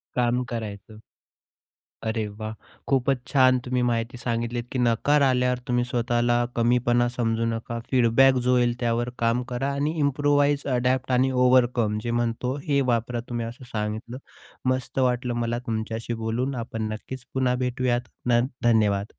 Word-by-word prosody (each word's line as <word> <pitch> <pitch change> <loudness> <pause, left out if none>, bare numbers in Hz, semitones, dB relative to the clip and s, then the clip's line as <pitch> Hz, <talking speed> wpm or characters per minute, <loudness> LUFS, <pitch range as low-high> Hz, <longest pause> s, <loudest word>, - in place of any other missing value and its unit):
काम 125 0 +1
करायचं. 110 -2 -6 1.1
अरे 110 -1 -1
वाह! 110 0 -4 0.3
खूपच 135 0 +2
छान 130 -2 +4
तुम्ही 125 0 0
माहिती 120 +1 -1
सांगितलीत, 120 0 -2
की 130 - -2
नकार 125 +5 +3
आल्यावर 125 -1 +2
तुम्ही 120 0 +1
स्वतःला 120 0 +1
कमीपणा 120 0 +2
समजू 115 -2 -1
नका 115 +1 -3
फीडबॅक 130 +1 +5
जो 125 - +4
होईल, 120 -1 +3
त्यावर 120 0 0
काम 115 +1 +2
करा 135 +3 -1
आणि 145 +3 -1
इम्प्रूवाइज, 145 0 +2
अडॅप्ट 125 +1 0
आणि 130 +1 +3
ओव्हरकम 125 -4 +3
जे 120 - -2
म्हणतो, 120 +3 -2
हे 140 -2 +1
वापरा 120 +1 -1
तुम्ही 120 -1 -2
असं 120 +3 -9
सांगितलं. 110 +3 -4 0.5
मस्त 130 0 -2
वाटलं 125 -1 +1
मला 120 +1 -1
तुमच्याशी 110 +1 -3
बोलून 125 +4 -1
आपण 115 -2 -4
नक्कीच 125 +3 -8
पुन्हा 130 -1 +1
भेटूयात. 125 -1 0 0.3
न 120 - +5 0.2
धन्यवाद. 105 -3 +2
120 Hz, 145 wpm, -25 LUFS, 115-130 Hz, 1.1 s, फीडबॅक